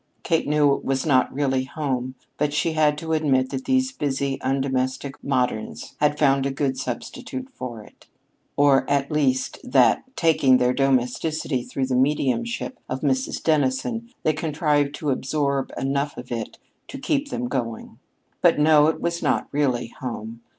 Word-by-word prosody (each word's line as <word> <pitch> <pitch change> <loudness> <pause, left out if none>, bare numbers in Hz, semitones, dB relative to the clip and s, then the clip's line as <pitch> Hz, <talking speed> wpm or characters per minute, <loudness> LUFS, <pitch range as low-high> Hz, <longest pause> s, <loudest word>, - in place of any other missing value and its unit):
Kate 165 -2 +1
knew 145 -1 +4
it - - -3
was 135 0 -1
not 130 -5 +3
really 135 -2 0
home, 130 -3 -3 0.2
but 150 0 0
she 165 - +1
had 150 -1 +3
to 160 +1 -3
admit 135 -5 +2
that 135 -1 -4
these 260 0 +2
busy 140 - -2
undomestic 135 0 -1
moderns 125 -5 -2
had 150 0 +2
found 135 -2 +3
a 140 - 0
good 135 -1 -1
substitute 255 - -5
for 120 -4 -7
it: - - -20 0.5
or, 140 -1 +4
at 140 0 +1
least, 135 -4 0
that, 255 +1 +4
taking 145 -6 +4
their 125 0 +2
domesticity 135 +2 0
through 130 +2 -3
the 130 - -2
mediumship 150 - 0
of 130 - -3
Mrs. 130 -3 -1
Dennison, 160 - 0
they 155 - +3
contrived 150 -2 0
to 150 -2 -2
absorb 140 0 -1
enough 140 +2 -1
of 125 0 -9
it 115 -2 -4 0.3
to 275 - -7
keep 280 +1 -1
them 245 -2 -3
going. 115 - -4 0.4
But, - - +5
no, 150 0 +5
it 160 - 0
was 170 0 -2
not - - 0
really 130 -5 0
home. 115 -2 -6
140 Hz, 160 wpm, -23 LUFS, 130-155 Hz, 0.5 s, But